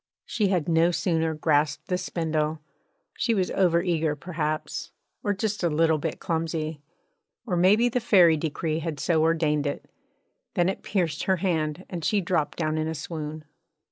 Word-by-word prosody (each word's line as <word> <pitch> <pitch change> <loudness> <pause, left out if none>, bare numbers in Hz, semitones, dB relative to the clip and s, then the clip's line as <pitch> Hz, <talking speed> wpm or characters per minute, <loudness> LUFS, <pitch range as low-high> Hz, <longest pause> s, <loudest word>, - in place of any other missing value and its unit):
She 210 -3 0
had 180 -5 0
no 165 0 +4
sooner 165 -2 0
grasped 150 0 +1
the 180 - 0
spindle 155 -3 -1 0.6
she 230 - +2
was 185 -3 0
over 170 -3 +3
eager 160 -4 0
perhaps, 155 -1 -3 0.3
or 205 - +1
just 205 +1 -2
a 175 - +2
little 160 0 +2
bit 155 +1 -3
clumsy, 160 -2 -2 0.6
or 190 -7 -1
maybe 200 +7 +4
the 245 +1 0
fairy 185 -8 +5
decree 155 +1 -2
had 160 -3 -4
so 160 +1 +2
ordained 155 -2 +2
it 140 - -4 0.7
than 175 +1 +3
it 195 - -4
pierced 170 -7 -1
her 190 - +3
hand 165 -2 -1
and 170 -3 -6
she 210 +6 +2
dropped 170 -5 -1
down 155 -1 0
in 155 - -1
a 160 - -3
swoon. 155 -1 -6
165 Hz, 170 wpm, -26 LUFS, 155-180 Hz, 0.7 s, fairy